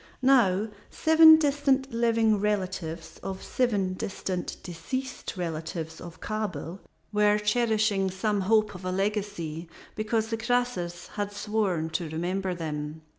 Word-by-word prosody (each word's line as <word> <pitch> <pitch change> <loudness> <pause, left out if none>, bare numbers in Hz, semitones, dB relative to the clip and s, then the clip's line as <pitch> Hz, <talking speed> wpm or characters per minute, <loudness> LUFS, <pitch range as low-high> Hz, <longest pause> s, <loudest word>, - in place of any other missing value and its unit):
Now, 220 -6 +4 0.2
seven 320 0 +7
distant 275 -3 +1
living 230 -2 +3
relatives 185 -5 -3
of 190 -1 -5
seven 205 -7 0
distant 185 -1 -4
deceased 255 +10 -5
relatives 160 -1 -4
of 170 -1 -10
Kabel 210 -4 -4 0.3
were 210 0 +4
cherishing 210 -2 +1
some 200 +2 -1
hope 215 +2 +2
of 180 0 -10
a 185 - -2
legacy, 195 -5 -2 0.3
because 220 +1 -1
the 225 - -1
Croesus 225 -8 -1
had 205 -1 -3
sworn 205 -6 -1
to 170 -2 -2
remember 180 +3 -2
them. 155 -1 -5
205 Hz, 125 wpm, -27 LUFS, 175-225 Hz, 0.3 s, seven